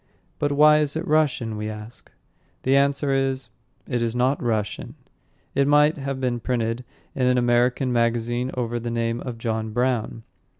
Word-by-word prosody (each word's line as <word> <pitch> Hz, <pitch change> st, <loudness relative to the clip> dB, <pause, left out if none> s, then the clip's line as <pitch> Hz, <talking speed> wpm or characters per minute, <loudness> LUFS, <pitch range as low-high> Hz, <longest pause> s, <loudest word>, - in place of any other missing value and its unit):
"But 145 Hz, -, 0 dB
why 150 Hz, +1 st, +6 dB
is 150 Hz, -1 st, -1 dB
it 160 Hz, +2 st, -2 dB
Russian?" 140 Hz, -7 st, +1 dB
we 105 Hz, 0 st, -3 dB
ask. 110 Hz, +2 st, -10 dB, 0.5 s
The 135 Hz, +1 st, +3 dB
answer 140 Hz, 0 st, +2 dB
is, 135 Hz, -1 st, -1 dB, 0.4 s
"It 125 Hz, -3 st, -1 dB
is 115 Hz, 0 st, -1 dB
not 130 Hz, +3 st, +1 dB
Russian." 110 Hz, -4 st, -2 dB, 0.6 s
It 140 Hz, 0 st, +2 dB
might 150 Hz, +2 st, +4 dB
have 135 Hz, -1 st, -3 dB
been 125 Hz, -2 st, -1 dB
printed 120 Hz, 0 st, -2 dB, 0.3 s
in 130 Hz, -2 st, +1 dB
an 125 Hz, 0 st, +3 dB
American 125 Hz, +1 st, +2 dB
magazine 120 Hz, +1 st, 0 dB
over 120 Hz, -1 st, -2 dB
the 120 Hz, +1 st, -4 dB
name 115 Hz, 0 st, -1 dB
of 125 Hz, -3 st, -6 dB
John 110 Hz, -1 st, -2 dB
Brown. 120 Hz, -2 st, -1 dB
125 Hz, 165 wpm, -24 LUFS, 115-135 Hz, 0.6 s, why